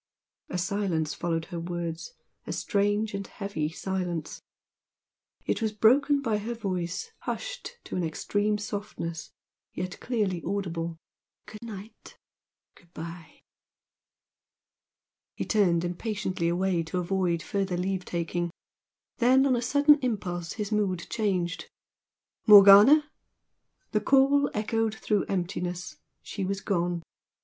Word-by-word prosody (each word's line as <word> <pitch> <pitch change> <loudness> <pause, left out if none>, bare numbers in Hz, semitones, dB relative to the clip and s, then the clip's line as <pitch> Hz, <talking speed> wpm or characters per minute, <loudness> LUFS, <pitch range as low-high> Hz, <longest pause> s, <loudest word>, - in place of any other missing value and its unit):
A 180 - -3
silence 180 -4 -1
followed 165 -1 -2
her 170 - -2
words, 170 - -5 0.3
a - - -3
strange 205 +1 0
and 200 0 -4
heavy 180 -7 -3
silence. 175 -2 -4 1.0
It - - -1
was 220 -1 0
broken 275 +7 +4
by 220 -4 +1
her 230 +3 -4
voice 185 - -3
hushed - - -5
to - - -6
an 180 - 0
extreme 205 +6 0
softness, 205 -6 -5 0.4
yet 185 +1 -4
clearly 205 -8 -1
audible. 170 -4 -3 0.5
"Good 215 - -11
night! 220 -2 -10 0.6
good 170 -2 -23
bye!" 165 -1 -9 1.9
He - - -3
turned 180 -6 +2
impatiently 185 -1 -2
away 175 0 +1
to 165 +3 -4
avoid 180 -2 0
further 195 -3 -1
leave 185 +1 -1
taking 175 0 -2 0.7
then, 260 +1 +5
on 265 -2 +3
a 240 - -1
sudden 290 +3 +5
impulse, 180 -9 -2
his 210 0 -4
mood 195 -5 0
changed. 185 -6 -1 0.8
"Morgana!" 210 +9 +9 0.8
The 210 - +1
call 275 +3 +4
echoed 220 +1 0
through 210 -2 0
emptiness. 180 -1 -3 0.3
She 195 - -5
was 195 +1 -2
gone. 175 -4 -1
195 Hz, 120 wpm, -28 LUFS, 175-215 Hz, 1.9 s, Morgana